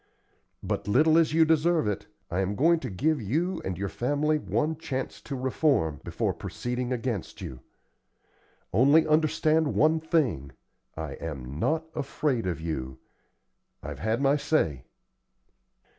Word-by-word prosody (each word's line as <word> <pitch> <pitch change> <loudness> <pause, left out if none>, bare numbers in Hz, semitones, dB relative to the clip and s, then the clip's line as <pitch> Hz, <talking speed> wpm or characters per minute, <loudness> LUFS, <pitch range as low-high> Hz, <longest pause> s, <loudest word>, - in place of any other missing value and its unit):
But, - - -3
little 155 +10 +4
as 160 -2 +3
you 160 +1 +5
deserve 160 -3 +2
it, 105 - -3 0.2
I 90 - 0
am 95 +1 0
going 165 +7 +4
to - - -5
give 145 +9 0
you 160 - -1
and 95 -2 -3
your 100 +1 -2
family 145 +8 0
one 155 +1 -1
chance 135 -5 -4
to 140 - -6
reform, 130 - +1
before - - -1
proceeding 125 +1 -4
against 120 -6 -3
you. 65 - -7 1.1
Only 140 - +5
understand 155 0 +2
one 155 +1 +4
thing, 135 - 0 0.4
I 80 -2 -4
am 70 -3 -6
not 160 - +1
afraid 135 -6 -1
of 85 -4 -2
you. 65 -6 -4 0.9
I've 70 0 -6
had 110 +5 0
my 140 +2 +4
say." 80 - 0
130 Hz, 140 wpm, -27 LUFS, 95-155 Hz, 1.1 s, you